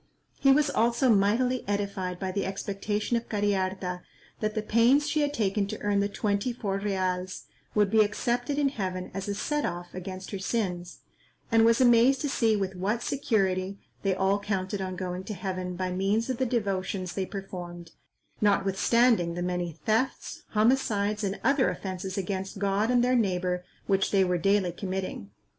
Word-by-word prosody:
He 275 - +5
was 295 +1 +4
also 235 +3 +2
mightily 230 +5 +2
edified 200 -3 -2
by 190 -1 -2
the 200 +1 -1
expectation 205 +4 -2
of 235 - -6
Cariharta 190 -3 -1 0.4
that 215 0 -2
the 215 - -1
pains 240 +7 +4
she 305 +1 +1
had 290 -1 +1
taken 205 -5 0
to - - -5
earn 205 -1 +1
the 200 0 +1
twenty 205 +3 -1
four 200 -5 -3
reals 185 -2 -2 0.3
would 205 -2 +3
be 220 0 +6
accepted 245 +6 -1
in 285 -1 +3
heaven 185 -7 -4
as 195 +1 -4
a 200 - -2
set 295 +7 -1
off 175 0 -4
against 185 +1 -7
her 200 - -4
sins, 185 -4 -3 0.5
and 225 0 +5
was 230 +2 +4
amazed 250 +1 +5
to 290 - -1
see 225 -5 +2
with 195 -2 -2
what 205 +6 -1
security 195 -7 0 0.2
they 195 -2 +1
all 195 +2 +2
counted 195 -1 -2
on 185 -1 -3
going 180 0 -4
to 210 - -5
heaven 185 -2 -4
by 185 0 -2
means 200 +6 0
of 255 - -3
the 260 - +1
devotions 195 -5 -2
they 190 -1 -2
performed, 175 -4 -7 0.5
notwithstanding 200 -1 +3
the 175 - -2
many 180 -1 -2
thefts, 225 +5 0
homicides, 215 -2 +2
and 195 -1 -2
other 275 -1 +3
offences 190 0 -5
against 190 0 -3
God 200 +2 +1
and 245 -1 +4
their 250 +1 +3
neighbour 180 -5 0 0.2
which 195 -1 +2
they 195 -2 +4
were 180 -1 +1
daily 195 0 +2
committing. 185 - -4
200 Hz, 175 wpm, -28 LUFS, 185-230 Hz, 0.5 s, be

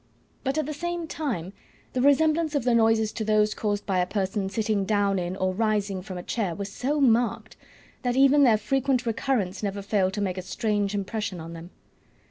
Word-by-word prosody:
But, 270 +2 -1
at 310 - +1
the 305 - -4
same 345 +2 -3
time, 230 - -4 0.4
the 255 - 0
resemblance 310 +3 +3
of 280 - +1
the 245 0 +2
noises 225 -1 +3
to 220 - -4
those 215 0 +2
caused 205 -1 -2
by 190 -2 +1
a 180 - +1
person 195 0 -1
sitting 210 -1 0
down 200 -1 +1
in 175 +1 -3
or 185 -1 0
rising 205 -2 0
from 185 0 -7
a 175 - -6
chair 195 -7 -2
was 200 0 -5
so 290 +4 -1
marked, 240 -3 +2 0.5
that 245 -1 -1
even 275 +2 +5
their 235 -6 +6
frequent 270 +2 0
recurrence 225 -4 -1
never 200 -1 -3
failed 195 -2 +1
to 205 - -2
make 190 -2 -1
a - - -3
strange 205 +1 -1
impression 205 -2 -3
on 165 +1 -8
them. 165 +1 -9
215 Hz, 200 wpm, -26 LUFS, 195-255 Hz, 0.5 s, their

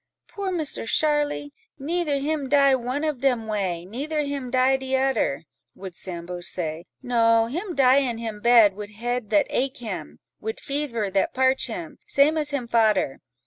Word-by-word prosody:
"Poor 395 -2 -4
Misser 315 -9 +1
Sharly! 295 0 +1 0.3
neither 305 0 -1
him 285 -1 -2
die 280 -1 +5
one 255 +3 -1
of 305 -5 -1
dem 250 -5 +1
way, 190 -5 -2
neither 290 +10 -3
him 280 -3 -4
die 255 +1 +3
de 265 0 -1
oder," 265 - 0 0.3
would 190 -2 -8
Sambo 175 0 -6
say: 170 -1 -3 0.2
"no, 230 -2 +3
him 345 - -4
die 265 -1 +5
in 255 -5 +1
him 220 -2 -6
bed, 230 -3 +6
wid 205 +1 -8
head 240 0 -3
that 205 -2 +3
ache 265 +1 -1
him, 190 - -6 0.2
wid 220 +1 -5
fever 260 -8 -2
that 195 0 0
parch 260 +1 +3
him, 175 -9 -7
same 285 +3 +3
as 300 -2 -1
him 280 -5 -3
fader. 215 -11 +2
250 Hz, 170 wpm, -24 LUFS, 210-280 Hz, 0.3 s, bed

